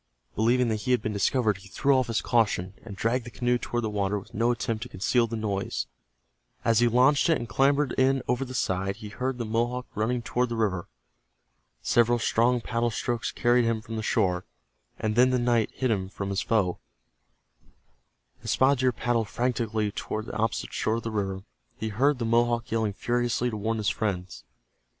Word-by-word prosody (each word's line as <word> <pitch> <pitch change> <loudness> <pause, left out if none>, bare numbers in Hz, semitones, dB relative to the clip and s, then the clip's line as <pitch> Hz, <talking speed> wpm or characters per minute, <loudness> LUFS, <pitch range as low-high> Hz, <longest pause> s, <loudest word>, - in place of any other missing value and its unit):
Believing 120 +3 +3
that 110 - 0
he 125 - -5
had 125 - +2
been 110 - -2
discovered, 105 +1 +1
he 95 +1 -14
threw 140 +7 +2
off 130 -1 +2
his 115 -1 -1
caution, 100 -6 +1
and 105 -4 -8
dragged 115 +5 0
the 120 - -8
canoe 120 +1 0
toward 120 0 -2
the 110 - -1
water 100 0 0
with 100 - -10
no 115 +3 +1
attempt 115 -2 -1
to - - -6
conceal 115 +5 +1
the 115 - -4
noise. 105 -3 -2 0.8
As 115 -1 +4
he 120 - +4
launched 130 +7 +4
it 165 - +4
and 120 - -6
clambered 140 +5 +2
in 130 0 +3
over 125 +2 +1
the 130 -1 -7
side, 95 -3 -1
he 105 -1 -9
heard 130 +4 -3
the 120 - -3
Mohawk 120 +3 -1
running 120 +3 -1
toward 125 +1 0
the 120 - -3
river. 100 -4 -1 1.0
Several 120 0 +3
strong 120 +1 +2
paddle 115 +1 0
strokes 120 +1 -2
carried 120 0 +3
him 115 -1 +1
from 110 +1 -7
the 110 - -2
shore, 95 -5 +1 0.5
and 110 -1 -1
then 125 +2 +5
the 130 - +2
night 120 -3 +2
hid 130 -2 -1
him 95 -3 -1
from 100 0 -5
his 100 +2 0
foe. 100 -7 +1 1.6
As - - -6
Spotted 135 0 +3
Deer 130 0 +3
paddled 115 -2 -1
frantically 115 -4 -1
toward 110 +1 -4
the - - -7
opposite 110 0 -1
shore 110 - 0
of 115 - -4
the 115 - -3
river, 95 -2 -2 0.3
he 110 - -3
heard 135 +7 +2
the 120 - -2
Mohawk 120 0 +1
yelling 110 -2 0
furiously 120 +2 0
to - - -4
warn 110 +2 -1
his 105 -3 +1
friends. 90 - -3
115 Hz, 200 wpm, -27 LUFS, 105-120 Hz, 1.6 s, then